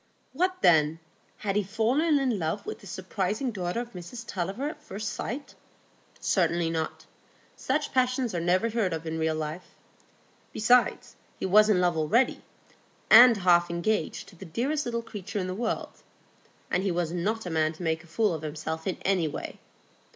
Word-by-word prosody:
What 365 +5 -1
then? 160 -2 +5 0.4
Had 200 -2 -2
he 210 - +3
fallen 240 - +1
in 255 -7 0
love 165 +5 -2
with - - -6
this 200 - -12
surprising 190 +7 -2
daughter 185 +2 -2
of 240 0 -9
Mrs 185 +6 -8
Tulliver 195 +7 -3
at 305 0 -7
first 215 -5 -5
sight? 275 +4 -5 0.7
Certainly 170 -2 +1
not. 160 -1 -3 0.5
Such 295 +3 -2
passions 255 -2 +1
are 175 - -1
never 185 +7 +1
heard 215 -6 0
of 165 0 -5
in 160 0 -3
real 160 0 +1
life. 155 +3 -6 0.8
Besides, 245 +3 +2 0.2
he - - -2
was 210 +3 +5
in 200 -4 +4
love 175 -1 +2
already, 190 +12 +2 0.7
and 240 +1 +9
half 175 -2 +4
engaged 170 +5 -1
to - - -17
the 180 - -11
dearest 255 - -2
little 235 -1 -2
creature 210 -2 -7
in 190 - -1
the 185 - -3
world; 225 +3 -3 0.7
and 180 - +2
he 195 - 0
was 170 -2 -1
not 205 +6 -2
a 175 - -4
man 155 -1 +2
to 160 - -9
make 160 -1 -1
a - - -17
fool 205 +3 +1
of 160 - -4
himself 160 +2 -5
in 185 - -1
any 185 -4 +2
way. 150 - -6
195 Hz, 180 wpm, -27 LUFS, 170-235 Hz, 0.8 s, and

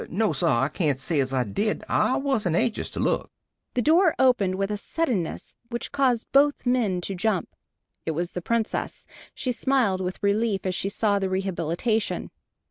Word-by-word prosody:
"No, 205 -1 +1
sir. 135 - +1
I 130 +2 +3
cain't 150 -4 -1
say 150 +3 0
as 135 -1 0
I 130 -2 +1
did. 205 - -2
I 215 +4 +2
wasn't 225 - 0
anxious 220 +5 0
to - - -7
look." - - 0 0.5
The 245 - +1
door 330 - +4
opened, 220 -8 +3
with 195 +2 -1
a - - 0
suddenness 225 - -2 0.2
which 240 -1 -4
caused 260 -5 +1
both 285 +1 +3
men 230 -8 +1
to 195 - -3
jump. 190 0 0 0.5
It 160 - -1
was 175 0 -2
the 180 - -4
Princess. 230 +4 -2 0.3
She 255 - -1
smiled 235 -6 +1
with 185 0 -3
relief 200 -1 +1
as 185 - 0
she 195 - 0
saw 205 0 +1
the 190 -1 -1
rehabilitation. 190 +3 -1
200 Hz, 180 wpm, -25 LUFS, 180-240 Hz, 0.5 s, door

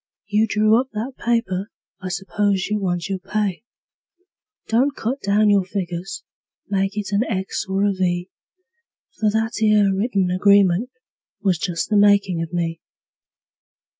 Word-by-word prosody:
You 210 +2 +2
drew 215 +2 +3
up 265 - -9
that 225 +6 -4
paper 230 -4 0 0.3
I 185 - -4
s'pose 195 +1 0
you 210 - +1
want 175 -3 -2
your 195 -1 -3
pay. 200 0 -2 1.0
Don't 265 +5 +2
cut 255 +5 -3
down 205 +1 +3
your 200 -2 +4
figures; 185 0 -5 0.4
make 195 +1 -1
it 205 -1 -3
an 205 +3 +2
X 190 -4 -3
or 195 +1 +1
a 200 - +1
V; 180 -1 -1 0.9
For 215 - +3
that 220 +1 -1
'ere 210 -2 +4
written 195 -3 0
agreement 200 +3 +4 0.5
was 185 -4 +2
just 170 -2 -2
the 210 - +4
makin' 200 -4 +4
of 165 -1 -5
me. 165 -1 -2
200 Hz, 145 wpm, -21 LUFS, 185-215 Hz, 1.0 s, your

